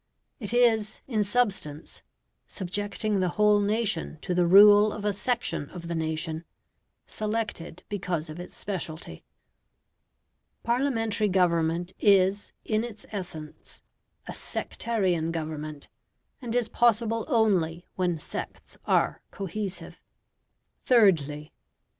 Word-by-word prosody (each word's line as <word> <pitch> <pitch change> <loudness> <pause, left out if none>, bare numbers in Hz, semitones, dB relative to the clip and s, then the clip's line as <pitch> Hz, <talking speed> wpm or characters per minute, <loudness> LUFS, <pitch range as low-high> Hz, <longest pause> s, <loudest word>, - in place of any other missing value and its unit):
It 210 -4 -3
is, 225 -3 +3
in 220 -5 +1
substance, 195 -9 0 0.5
subjecting 205 +2 -2
the 185 -1 +1
whole 210 0 +5
nation 205 -6 -1
to 180 - -1
the 175 -1 +3
rule 205 +3 +8
of 205 0 -6
a 205 - +2
section 220 - -1
of 170 -2 -8
the 170 - -3
nation, 160 0 -2 0.6
selected 215 -6 -4
because 180 -5 -3
of 155 +2 -8
its 175 - -8
speciality. 175 -5 -5 1.4
Parliamentary 235 -4 +1
government 175 -2 +1
is, 200 -1 +3
in 215 0 +1
its 230 -3 -7
essence, 170 -7 -7 0.4
a - - -5
sectarian 185 -8 -1
government, 155 -2 -5 0.5
and 240 -2 -4
is 245 -2 +2
possible 230 -1 +2
only 190 - +1
when 175 -3 -1
sects - - -7
are - - +1
cohesive. 195 -3 -5 0.8
Thirdly. 155 - +3
195 Hz, 110 wpm, -27 LUFS, 170-215 Hz, 1.4 s, rule